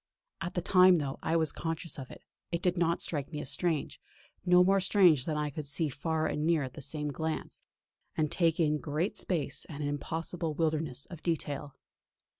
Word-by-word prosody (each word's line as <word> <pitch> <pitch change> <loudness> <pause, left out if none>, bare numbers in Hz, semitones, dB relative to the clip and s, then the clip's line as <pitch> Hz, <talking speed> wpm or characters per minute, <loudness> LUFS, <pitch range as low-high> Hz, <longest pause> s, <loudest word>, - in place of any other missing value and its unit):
At 175 +2 -4
the 175 - -1
time, 185 0 +6
though 140 -5 -2
I 165 - 0
was 160 -2 +3
conscious 165 -1 -4
of 130 - -7
it, - - -12 0.3
it 170 0 -2
did 180 -1 +2
not 170 -1 +1
strike 145 -3 -1
me 150 - -4
as 140 - -2
strange; 170 -5 -1 0.4
no 180 0 +6
more 195 +2 +4
strange 180 -8 +4
than 155 - -1
that - - -1
I 150 -1 -1
could 150 0 -6
see 150 +2 +1
far 160 +3 -1
and 150 - -1
near 160 -2 +2
at 130 -1 -6
the 155 - -9
same 150 +2 -3
glance, 160 +2 -4 0.6
and 155 -2 +1
take 165 -2 +2
in 150 -2 +2
great 155 +6 -2
space 150 -7 -1
and 150 -2 -6
an 145 - -1
impossible 160 +2 -3
wilderness 155 -4 -1
of 170 -4 -10
detail. 145 -4 -3
160 Hz, 205 wpm, -31 LUFS, 145-170 Hz, 0.6 s, time